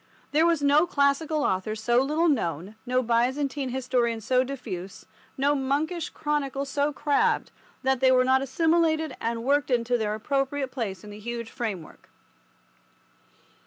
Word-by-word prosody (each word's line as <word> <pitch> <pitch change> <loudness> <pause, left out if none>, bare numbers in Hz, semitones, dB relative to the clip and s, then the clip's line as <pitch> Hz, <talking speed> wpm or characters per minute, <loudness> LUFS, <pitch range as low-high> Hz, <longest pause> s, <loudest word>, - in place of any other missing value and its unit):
There 315 +3 +4
was 330 -4 +1
no 295 +4 +4
classical 290 +1 +1
author 190 -1 -1
so 240 +3 +2
little 305 +5 +1
known, 190 - -1
no 255 +1 +1
Byzantine 260 +4 0
historian 245 -2 0
so 250 +4 +2
diffuse, 210 -9 -7 0.3
no 280 +2 +2
monkish 290 +5 -1
chronicle 280 -2 -2
so 285 +2 0
crabbed, 295 - +1 0.3
that 265 -1 +2
they 260 0 +5
were 255 0 +4
not 260 +1 +3
assimilated 320 +1 +1
and 230 0 -2
worked 285 +3 +2
into 245 -1 +1
their 210 -1 -1
appropriate 270 +3 -1
place 215 -7 -4
in 210 - -10
the 205 - -10
huge 235 +1 -5
framework. 200 -9 -6
265 Hz, 145 wpm, -26 LUFS, 235-290 Hz, 0.3 s, they